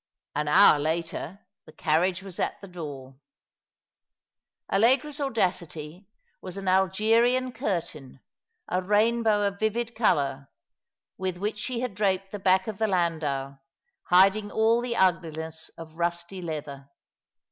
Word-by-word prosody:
An 150 Hz, 0 st, -2 dB
hour 155 Hz, -1 st, +6 dB
later 165 Hz, +4 st, -3 dB, 0.2 s
the -, -, -12 dB
carriage 175 Hz, +5 st, 0 dB
was 190 Hz, -3 st, -9 dB
at -, -, -2 dB
the 200 Hz, -, -11 dB
door. 145 Hz, -7 st, -8 dB, 1.6 s
Allegra's 265 Hz, +8 st, +2 dB
audacity 180 Hz, -, -2 dB, 0.3 s
was 185 Hz, 0 st, -8 dB
an 195 Hz, -1 st, -6 dB
Algerian 225 Hz, +7 st, +3 dB
curtain, 170 Hz, -, -4 dB, 0.5 s
a 185 Hz, -, 0 dB
rainbow 215 Hz, +2 st, +2 dB
of 200 Hz, 0 st, -2 dB
vivid 230 Hz, +2 st, -1 dB
colour, 140 Hz, -, 0 dB, 0.7 s
with 185 Hz, -1 st, -2 dB
which 210 Hz, +3 st, -3 dB
she 245 Hz, +1 st, -3 dB
had 250 Hz, -4 st, -3 dB
draped 195 Hz, -1 st, 0 dB
the 205 Hz, -, -5 dB
back 190 Hz, 0 st, +3 dB
of 215 Hz, -3 st, -6 dB
the 220 Hz, -, +2 dB
lacdau, 155 Hz, -7 st, -1 dB, 0.5 s
hiding 195 Hz, +3 st, +4 dB
all 225 Hz, +2 st, +2 dB
the 240 Hz, -1 st, -3 dB
ugliness 160 Hz, -3 st, -1 dB
of 160 Hz, -1 st, -10 dB
rusty 170 Hz, +2 st, -2 dB
leather. 145 Hz, -4 st, -6 dB
185 Hz, 125 wpm, -26 LUFS, 160-215 Hz, 1.6 s, hour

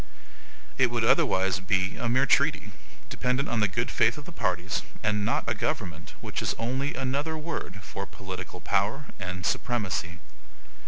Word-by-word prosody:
It 130 Hz, -2 st, +6 dB
would 120 Hz, -1 st, 0 dB
otherwise 95 Hz, -, +4 dB
be 95 Hz, 0 st, +1 dB
a 120 Hz, -, -1 dB
mere 130 Hz, +3 st, +4 dB
treaty, -, -, +3 dB, 0.4 s
dependent 125 Hz, +2 st, +1 dB
on 120 Hz, -, 0 dB
the 105 Hz, -, +4 dB
good 95 Hz, -, -1 dB
faith 110 Hz, +2 st, +3 dB
of 150 Hz, -, -8 dB
the -, -, -9 dB
parties, 95 Hz, -, 0 dB, 0.2 s
and 105 Hz, -1 st, +2 dB
not 105 Hz, -, 0 dB
a -, -, +2 dB
government, 80 Hz, -2 st, -3 dB
which -, -, -3 dB
is -, -, 0 dB
only 130 Hz, +5 st, -1 dB
another 140 Hz, +5 st, -1 dB
word 150 Hz, -, -5 dB
for 100 Hz, -, -5 dB
POLITICAL 95 Hz, -2 st, -7 dB
POWER 105 Hz, +11 st, +1 dB
AND 90 Hz, -1 st, -4 dB
SUPREMACY. 100 Hz, -7 st, 0 dB
110 Hz, 160 wpm, -28 LUFS, 95-130 Hz, 0.4 s, It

